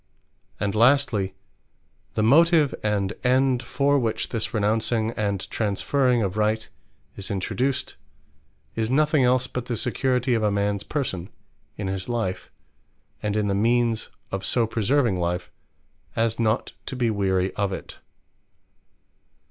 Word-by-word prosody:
And 100 Hz, -1 st, -1 dB
lastly 115 Hz, -5 st, +3 dB, 0.8 s
the 110 Hz, -, +1 dB
motive, 155 Hz, +3 st, +5 dB
and 105 Hz, -2 st, 0 dB
end 130 Hz, 0 st, +3 dB
for 140 Hz, +3 st, +1 dB
which 115 Hz, -3 st, -2 dB
this 115 Hz, -2 st, -3 dB
renouncing, 110 Hz, +1 st, +1 dB
and 100 Hz, -4 st, -2 dB
transferring 120 Hz, +3 st, +1 dB
or 100 Hz, -, +1 dB
Right 110 Hz, +3 st, 0 dB, 0.5 s
is 100 Hz, -, -5 dB
introduced, 125 Hz, +7 st, -2 dB, 0.8 s
is 110 Hz, -1 st, -1 dB
nothing 150 Hz, +1 st, +3 dB
else 125 Hz, 0 st, +3 dB
but 125 Hz, -1 st, -5 dB
the 120 Hz, -, -2 dB
security 125 Hz, +1 st, 0 dB
of 115 Hz, -, +1 dB
a 105 Hz, -, +2 dB
mans 100 Hz, 0 st, 0 dB
person, 100 Hz, -, -3 dB, 0.5 s
in 100 Hz, -, -4 dB
his 95 Hz, +2 st, -3 dB
life, 115 Hz, -6 st, -2 dB, 0.7 s
and 105 Hz, -1 st, -1 dB
in 105 Hz, -1 st, +1 dB
the 100 Hz, -, +1 dB
means 115 Hz, +2 st, +1 dB, 0.2 s
of 95 Hz, 0 st, -3 dB
so 120 Hz, -2 st, +2 dB
preserving 115 Hz, -1 st, +1 dB
life, 85 Hz, 0 st, -2 dB, 0.6 s
as 115 Hz, 0 st, 0 dB
not 110 Hz, +1 st, +1 dB, 0.2 s
to -, -, -4 dB
be 120 Hz, -3 st, +1 dB
weary 95 Hz, -2 st, 0 dB
of 100 Hz, -1 st, -1 dB
it. 95 Hz, -, -7 dB
110 Hz, 135 wpm, -24 LUFS, 100-125 Hz, 0.8 s, motive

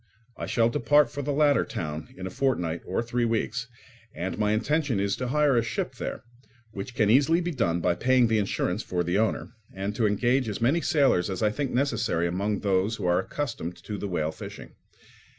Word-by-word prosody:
I -, -, -5 dB
shall 115 Hz, -2 st, +3 dB
depart 145 Hz, +3 st, +3 dB
for 145 Hz, -, -4 dB
the 145 Hz, +1 st, -2 dB
latter 145 Hz, 0 st, +3 dB
town 75 Hz, -1 st, -5 dB
in 95 Hz, -, -6 dB
a 95 Hz, -, -5 dB
fortnight 90 Hz, -12 st, 0 dB
or 95 Hz, +5 st, -1 dB
three 120 Hz, +1 st, -1 dB
weeks; 115 Hz, +2 st, -1 dB, 0.5 s
and 90 Hz, +2 st, -3 dB
my 105 Hz, 0 st, +1 dB
intention 140 Hz, +1 st, +1 dB
is 100 Hz, 0 st, 0 dB
to 125 Hz, -, -3 dB
hire 145 Hz, +1 st, +3 dB
a 120 Hz, -, +4 dB
ship 115 Hz, -, -3 dB
there, -, -, -5 dB, 0.5 s
which 105 Hz, +5 st, -7 dB
can 105 Hz, -2 st, +3 dB
easily 145 Hz, +7 st, +4 dB
be 175 Hz, 0 st, -2 dB
done 90 Hz, -, 0 dB
by 90 Hz, +1 st, +2 dB
paying 125 Hz, +6 st, +3 dB
the 110 Hz, -1 st, +2 dB
insurance 100 Hz, -1 st, -1 dB
for 90 Hz, -4 st, -2 dB
the 90 Hz, +4 st, 0 dB
owner, 110 Hz, 0 st, -1 dB, 0.2 s
and 100 Hz, +2 st, -4 dB
to 110 Hz, -1 st, +2 dB
engage 120 Hz, +4 st, +1 dB
as 105 Hz, -, -4 dB
many 135 Hz, +9 st, +2 dB
sailors 135 Hz, -, +2 dB
as 95 Hz, +2 st, -3 dB
I 105 Hz, -, +3 dB
think 140 Hz, +4 st, -2 dB
necessary 120 Hz, -10 st, 0 dB
among 100 Hz, +4 st, -1 dB
those 100 Hz, +2 st, +1 dB
who -, -, -5 dB
are 90 Hz, 0 st, +3 dB
accustomed 95 Hz, -, -4 dB
to 105 Hz, -2 st, -5 dB
the 100 Hz, -, -3 dB
whale 80 Hz, -4 st, -1 dB
fishing. -, -, -9 dB
110 Hz, 205 wpm, -27 LUFS, 95-130 Hz, 0.5 s, a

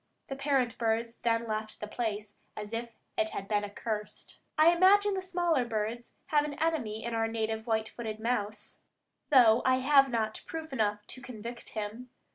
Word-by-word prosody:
The 270 Hz, -, -3 dB
parent 270 Hz, -4 st, 0 dB
birds 230 Hz, 0 st, 0 dB
then 230 Hz, -1 st, +1 dB
left 215 Hz, -1 st, -4 dB
the -, -, -4 dB
place 210 Hz, -2 st, -3 dB, 0.2 s
as 210 Hz, +1 st, -6 dB
if 235 Hz, +1 st, -3 dB, 0.3 s
it 220 Hz, -, +2 dB
had 195 Hz, -, -5 dB
been 210 Hz, -1 st, +1 dB
accursed. 210 Hz, +1 st, -5 dB, 0.2 s
I 310 Hz, +2 st, +7 dB
imagine 395 Hz, +4 st, +5 dB
the 380 Hz, -, -1 dB
smaller 350 Hz, -7 st, +1 dB
birds 230 Hz, +1 st, -3 dB, 0.2 s
have 295 Hz, -1 st, +4 dB
an 295 Hz, -1 st, -4 dB
enemy 285 Hz, -9 st, -1 dB
in 235 Hz, -, -3 dB
our 225 Hz, 0 st, +1 dB
native 220 Hz, 0 st, -2 dB
white 220 Hz, -1 st, +1 dB
footed 220 Hz, -2 st, -6 dB
mouse, 220 Hz, -2 st, -2 dB, 0.5 s
though 245 Hz, -4 st, +7 dB
I 260 Hz, -, +4 dB
have 275 Hz, +1 st, +5 dB
not 220 Hz, -3 st, -1 dB
proof 320 Hz, -3 st, -6 dB
enough 210 Hz, -3 st, 0 dB
to 255 Hz, -, -9 dB
convict 235 Hz, -1 st, -8 dB
him. 220 Hz, +3 st, -5 dB
230 Hz, 175 wpm, -30 LUFS, 220-270 Hz, 0.5 s, I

